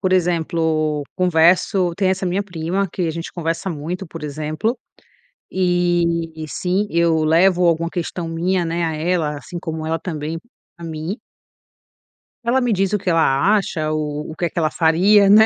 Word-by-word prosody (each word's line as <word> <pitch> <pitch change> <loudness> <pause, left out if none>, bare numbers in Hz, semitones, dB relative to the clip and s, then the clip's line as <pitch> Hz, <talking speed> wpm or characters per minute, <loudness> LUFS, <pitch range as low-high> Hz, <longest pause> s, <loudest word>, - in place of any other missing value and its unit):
Por 185 -2 +1
exemplo, 160 -4 +1
converso 180 +1 +3
tem 195 -2 +2
essa 190 0 -1
minha 185 +3 0
prima 180 +1 -2
que 185 - -2
a - - 0
gente 165 +1 -6
conversa 165 +2 -2
muito, 170 +4 -5
por - - -9
exemplo, 155 - -2 0.7
e, 175 -3 0
sim, 185 +6 -1
eu 165 -1 +2
levo 175 +3 +4
alguma 170 0 +2
questão 175 -1 -4
minha, 175 +2 0
né, 170 +1 -1
a 160 -1 -2
ela, 155 -2 0
assim 175 +4 -7
como 160 -2 -4
ela 165 +1 -1
também 160 -1 -4 0.4
a 170 - -11
mim. 160 +5 -4 1.3
Ela 245 +3 +2
me 245 -2 +1
diz 195 0 +1
o - - +4
que 195 -2 -3
ela 165 +3 +3
acha 155 -6 -2
ou 150 -1 -3
o - - -8
que 175 +1 -1
que 170 - -3
ela 155 -1 +1
faria, 195 +5 +4
né, 215 +2 +8
170 Hz, 170 wpm, -20 LUFS, 160-185 Hz, 1.3 s, né